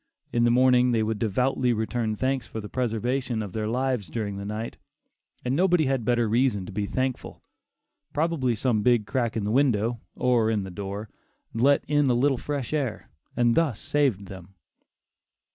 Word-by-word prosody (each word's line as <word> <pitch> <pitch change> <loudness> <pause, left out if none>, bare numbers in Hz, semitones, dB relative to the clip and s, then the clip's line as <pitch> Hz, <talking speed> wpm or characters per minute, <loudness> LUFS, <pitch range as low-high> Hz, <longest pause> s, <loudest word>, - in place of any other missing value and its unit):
In 120 0 +3
the - - +4
morning 125 0 +4
they 110 -1 +2
would 110 -1 -2
devoutly 125 +3 +1
return 110 0 -1
thanks 130 +2 -1
for 110 - -6
the 105 - -6
"preservation 120 0 -1
of 100 -3 -8
their 110 -1 -2
lives," 125 -3 -1
during 105 -4 -3
the 100 - -6
night, 105 +2 -5 0.7
and 125 +2 0
nobody 175 -1 +3
had 135 -3 0
better 120 0 +2
reason 115 -3 +1
to - - -8
be 100 +1 -2
thankful. 130 +2 -3 0.7
Probably 150 -6 0
some 110 -1 +1
big 120 -1 +3
crack 120 -1 -1
in 110 - -1
the 105 - -1
window, 120 -3 +2 0.2
or 120 -3 +2
in 105 -3 0
the 95 - -7
door, 100 +3 -5 0.5
let 135 +5 +3
in 145 -1 +2
a 125 - +3
little 135 +1 +2
fresh 145 -2 -4
air, 135 -7 -3 0.3
and 120 -1 +3
thus 145 -8 +1
saved 135 -10 0
them. 95 0 -11
120 Hz, 180 wpm, -26 LUFS, 110-130 Hz, 0.7 s, the